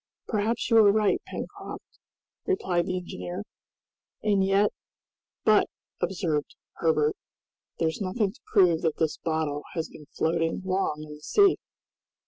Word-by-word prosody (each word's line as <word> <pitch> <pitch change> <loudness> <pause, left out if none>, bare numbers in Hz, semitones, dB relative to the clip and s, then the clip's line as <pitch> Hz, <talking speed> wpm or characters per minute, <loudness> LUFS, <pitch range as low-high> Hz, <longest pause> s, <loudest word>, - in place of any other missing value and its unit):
"Perhaps 220 +2 0
you 230 - +7
are 210 -2 +8
right, 210 -1 +2
Pencroft," - - -8 0.5
replied 180 - +1
the 185 - -1
engineer; 180 +1 -5 0.8
"and 205 -2 +3
yet 195 +2 +3 0.4
" - - -61
"But," - - +5 0.3
observed 165 -6 -1 0.2
Herbert, 155 -2 +2 0.6
"there's 160 +4 -1
nothing 195 +1 0
to 265 - -22
prove 180 -6 +5
that 160 -2 0
this 160 -2 0
bottle 155 -3 -1
has 165 -1 -2
been 150 - -13
floating 165 +2 0
long 185 -5 0
in 150 -1 -9
the 150 - -12
sea." 400 - +4
180 Hz, 135 wpm, -27 LUFS, 160-205 Hz, 0.8 s, are